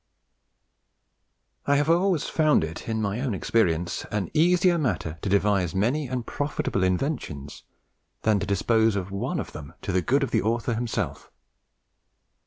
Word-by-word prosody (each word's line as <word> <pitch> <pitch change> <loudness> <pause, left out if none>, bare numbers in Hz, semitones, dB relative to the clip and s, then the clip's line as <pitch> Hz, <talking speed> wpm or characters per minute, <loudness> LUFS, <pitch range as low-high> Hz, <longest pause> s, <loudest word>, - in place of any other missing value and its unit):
"I 140 - +4
have 145 +1 +2
always 170 -1 +3
found 155 - +2
it 80 +7 -6
in 110 -1 -1
mine 100 +2 -1
own 130 -5 -1
experience 85 -5 0
an 105 -2 -2
easier 175 +2 +4
matter 85 - -2
to - - -2
devise 100 -2 +2
manie 130 +9 +1
and 125 -1 -3
profitable 145 -9 -2
inventions, 90 - -2 0.6
than 110 -2 +3
to 100 - -3
dispose 110 +2 +2
of 95 -1 -3
one 100 - -2
of - - -5
them 75 +3 -10
to 100 - -2
the 95 0 +2
good 135 - +2
of 135 - -2
the - - +2
author 115 +3 0
himself." 110 - -3
110 Hz, 155 wpm, -26 LUFS, 95-140 Hz, 0.6 s, I